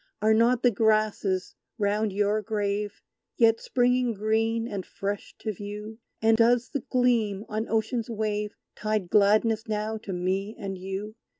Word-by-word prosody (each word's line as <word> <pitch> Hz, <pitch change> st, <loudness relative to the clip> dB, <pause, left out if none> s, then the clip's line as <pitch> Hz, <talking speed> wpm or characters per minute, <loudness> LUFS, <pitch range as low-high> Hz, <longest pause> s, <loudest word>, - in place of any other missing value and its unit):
Are 215 Hz, +1 st, +4 dB
not 235 Hz, +2 st, +3 dB
the 245 Hz, -, +5 dB
grasses 215 Hz, -3 st, +1 dB, 0.2 s
round 210 Hz, 0 st, +1 dB
your 205 Hz, +2 st, +1 dB
grave 205 Hz, -1 st, -2 dB, 0.3 s
Yet 225 Hz, -1 st, +4 dB
springing 250 Hz, -1 st, +1 dB
green 225 Hz, +2 st, 0 dB
and 200 Hz, -5 st, -4 dB
fresh 200 Hz, +2 st, -5 dB
to 215 Hz, -, -2 dB
view? 210 Hz, +3 st, -7 dB, 0.2 s
And 225 Hz, 0 st, +5 dB
does 240 Hz, +1 st, +3 dB
the 285 Hz, -, -2 dB
gleam 230 Hz, -5 st, +1 dB
on 215 Hz, +1 st, -3 dB
Ocean's 225 Hz, +1 st, -1 dB
wave 210 Hz, -2 st, -2 dB, 0.2 s
Tide 215 Hz, -4 st, -2 dB
gladness 215 Hz, +2 st, +3 dB
now 215 Hz, +1 st, -2 dB
to 215 Hz, -, -7 dB
me 190 Hz, +4 st, -2 dB
and 195 Hz, -1 st, -5 dB
you? 195 Hz, +4 st, -6 dB
215 Hz, 145 wpm, -27 LUFS, 205-225 Hz, 0.3 s, the